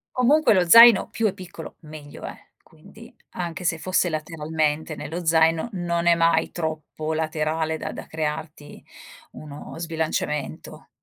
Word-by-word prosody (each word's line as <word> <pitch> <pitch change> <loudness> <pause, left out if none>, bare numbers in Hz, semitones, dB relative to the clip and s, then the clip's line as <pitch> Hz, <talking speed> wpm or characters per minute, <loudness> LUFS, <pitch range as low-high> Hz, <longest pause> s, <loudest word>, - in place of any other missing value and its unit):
Comunque 260 +1 +4
lo 180 -3 +2
zaino 230 +2 +8
più 225 -1 0
è 195 - -2
piccolo 180 -4 -10
meglio 150 -2 -11
è. - - -9
Quindi - - -17 0.2
anche 175 0 -5
se 165 -2 0
fosse 185 +1 0
lateralmente 155 0 -2
nello 160 +4 -6
zaino, 160 +4 +2
non 170 -2 -2
è 170 - +6
mai 165 0 +2
troppo 155 -1 -4
laterale 160 0 -2
da - - -5
da - - -8
crearti 155 -1 -6 0.5
uno 150 -1 -10
sbilanciamento 160 -3 -4
160 Hz, 135 wpm, -23 LUFS, 155-175 Hz, 0.5 s, zaino